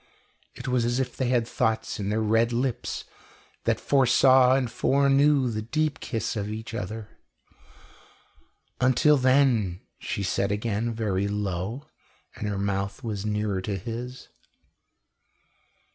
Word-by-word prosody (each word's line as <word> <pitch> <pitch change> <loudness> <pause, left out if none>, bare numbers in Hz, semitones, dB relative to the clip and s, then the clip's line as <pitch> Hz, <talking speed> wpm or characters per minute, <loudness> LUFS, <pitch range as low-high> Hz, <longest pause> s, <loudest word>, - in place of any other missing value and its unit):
It - - -8
was 125 -2 +1
as 120 +2 0
if 125 -2 -2
they 130 - -1
had 120 -2 +1
thoughts 110 0 -1
in 100 -1 -2
their 110 +1 0
red 115 +2 +2
lips 125 +1 -2 0.6
that - - +1
foresaw 130 -1 +5
and 135 -2 +1
foreknew 140 +2 +3
the 110 -1 -3
deep 155 +6 -1
kiss 115 -1 -3
of 105 -1 -3
each 110 +2 -6
other. 110 0 -6 1.6
"Until 130 +4 +4
then 130 -8 +2
" - - -50
she 100 - -3
said 100 +1 0
again, 110 +2 -1
very 100 -4 -1
low, 105 +5 -3 0.5
and 105 - -4
her 100 -1 -2
mouth 100 +3 -2
was 105 -3 -3
nearer 105 -2 -1
to 100 +1 -3
his. 120 +5 -7
115 Hz, 135 wpm, -26 LUFS, 105-130 Hz, 1.6 s, foresaw